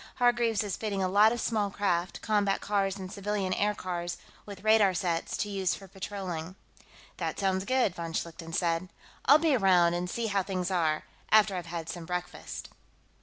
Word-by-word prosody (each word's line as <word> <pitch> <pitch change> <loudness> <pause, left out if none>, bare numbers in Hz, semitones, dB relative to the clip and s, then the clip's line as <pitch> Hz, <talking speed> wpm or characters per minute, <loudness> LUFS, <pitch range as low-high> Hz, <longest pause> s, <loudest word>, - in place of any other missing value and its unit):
Hargreaves 240 -3 +2
is 205 -2 -3
fitting 200 -3 -2
a - - +2
lot 205 +4 +5
of 240 - -2
small 215 -3 0
craft 185 -3 -1
combat 205 -2 +2
cars 200 -1 0
and 190 -1 -7
civilian 200 -2 -2
aircars 180 -4 -2 0.3
with 200 -1 -9
radar 215 -3 +5
sets, 170 -2 -1
to - - -1
use 195 -3 0
for 195 - -12
patrolling." 185 -3 -5 0.6
"That - - -3
sounds 190 -1 0
good," 255 -6 +2
von 165 -1 -5
Schlichten 165 0 -4
said. 170 +1 0 0.4
"I'll 285 +3 +8
be 310 -3 +3
around 180 -6 +4
and 175 +1 -2
see 235 +5 -2
how 200 -2 +1
things 185 -1 -2
are, 160 -4 +1 0.3
after 215 -2 +5
I've 175 -2 -4
had 165 -1 -5
some 165 0 -6
breakfast." 180 0 -5
195 Hz, 175 wpm, -29 LUFS, 175-210 Hz, 0.6 s, I'll